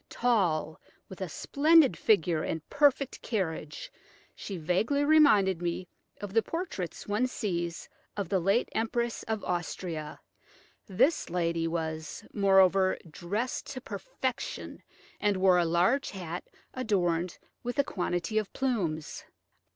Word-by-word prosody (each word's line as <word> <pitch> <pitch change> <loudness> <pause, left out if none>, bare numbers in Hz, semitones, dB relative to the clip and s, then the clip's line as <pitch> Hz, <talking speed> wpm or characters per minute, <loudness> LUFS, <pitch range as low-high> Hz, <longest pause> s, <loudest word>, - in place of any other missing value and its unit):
Tall, 175 -10 +1 0.3
with 190 0 -10
a 185 - -3
splendid 300 - +4
figure 170 -6 +2
and 160 0 -4
perfect 280 -2 +2
carriage, 220 - -3 0.4
she 195 - -6
vaguely 200 - +1
reminded 215 - +5
me 175 +1 -2 0.3
of 205 -2 -6
the 225 - +5
portraits 330 - -5
one 210 +5 +1
sees 175 -9 -3 0.3
of 200 -3 -2
the 190 +2 +1
late 195 +7 +2
Empress 230 +1 -1
of 220 -2 -2
Austria. 170 -3 -4 0.7
This 250 - +2
lady 170 -1 0
was, 160 -2 -4
moreover, 190 -1 +4
dressed 205 +11 -3
to 260 - -5
perfection, 235 +4 -5 0.4
and 205 -2 +1
wore 185 -1 +5
a 175 - +2
large 180 +12 +2
hat 175 -3 -6 0.3
adorned 180 -8 0 0.2
with 245 +2 -4
a 280 - +4
quantity 175 -1 -1
of 215 - -5
plumes. 185 - -2
195 Hz, 125 wpm, -29 LUFS, 170-235 Hz, 0.7 s, reminded